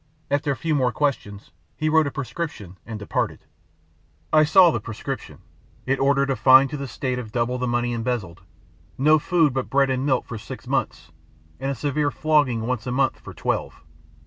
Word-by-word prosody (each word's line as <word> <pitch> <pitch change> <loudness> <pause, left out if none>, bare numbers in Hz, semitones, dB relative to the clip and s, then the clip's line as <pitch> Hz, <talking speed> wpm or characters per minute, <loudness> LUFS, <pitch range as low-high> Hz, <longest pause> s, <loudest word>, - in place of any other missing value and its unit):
After 145 +1 0
a - - -1
few 160 +3 -2
more 130 -4 +2
questions 110 -7 -3 0.3
he 155 - -1
wrote 155 -1 +4
a - - -3
prescription 140 - -5
and 110 -2 -5
departed. 105 - -3 0.9
I 155 0 +6
saw 175 +3 +6
the 120 - -2
prescription. 115 +4 -7 0.4
It 135 +1 0
ordered 140 0 +2
a - - +1
fine 130 +1 +6
to 150 - -5
the 140 -1 -5
State 125 +2 -3
of 110 -4 -8
double 120 +2 -1
the 125 - -1
money 120 0 0
embezzled; 115 -7 -3 0.6
no 155 +3 +4
food 160 -3 +2
but 130 -1 -3
bread 135 -1 +2
and 130 0 -1
milk 130 -3 +1
for 110 - -7
six - - -9
months, 80 - -2 0.5
and 135 +1 -2
a 140 - -2
severe 145 +3 0
flogging 145 -6 +1
once 125 -1 -3
a - - -2
month 135 +1 +1
for - - -10
twelve. - - -3
130 Hz, 190 wpm, -23 LUFS, 120-145 Hz, 0.9 s, I